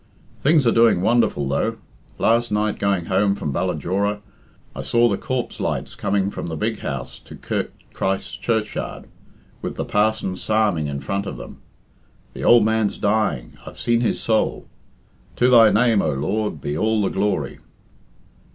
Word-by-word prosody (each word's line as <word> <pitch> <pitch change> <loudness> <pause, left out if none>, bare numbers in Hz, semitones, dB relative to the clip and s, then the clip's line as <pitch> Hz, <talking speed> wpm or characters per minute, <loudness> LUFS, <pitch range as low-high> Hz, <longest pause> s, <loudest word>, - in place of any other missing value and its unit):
Things 150 -1 +4
are 115 - +5
doing 115 -6 +4
wonderful, 115 - +2
though. 70 - -1 0.4
Last 115 0 +2
night 105 0 0
going 100 -4 0
home 100 +2 +2
from 75 -8 -3
Ballajora, 100 +7 -1 0.5
I - - -4
saw 120 0 +3
the 100 - +1
corpse 130 +4 -4
lights - - -2
coming 100 0 -1
from - - -5
the 80 - -4
big 75 - -2
house 70 -3 -5
to - - -13
Kirk - - -3 0.2
Christ's 95 0 -2
Churchyard, 110 -2 -2 0.6
with - - -4
the - - -3
parson 105 -2 +1
psalming 105 -5 0
in 70 -1 -4
front 100 +7 -3
of - - -5
them. - - -10 0.7
The - - -7
ould 120 -2 +6
man's 110 -2 +1
dying 100 - 0
I've - - -10
seen 120 0 +1
his 120 - 0
soul. 110 -1 0 0.7
To 125 - +3
thy 115 -3 +8
name, 110 -1 +3
O 80 - 0
Lord, 95 +4 -2
be 70 +2 -3
all 110 +4 +1
the 95 - +1
glory." 95 -9 -1
105 Hz, 160 wpm, -22 LUFS, 95-110 Hz, 0.7 s, thy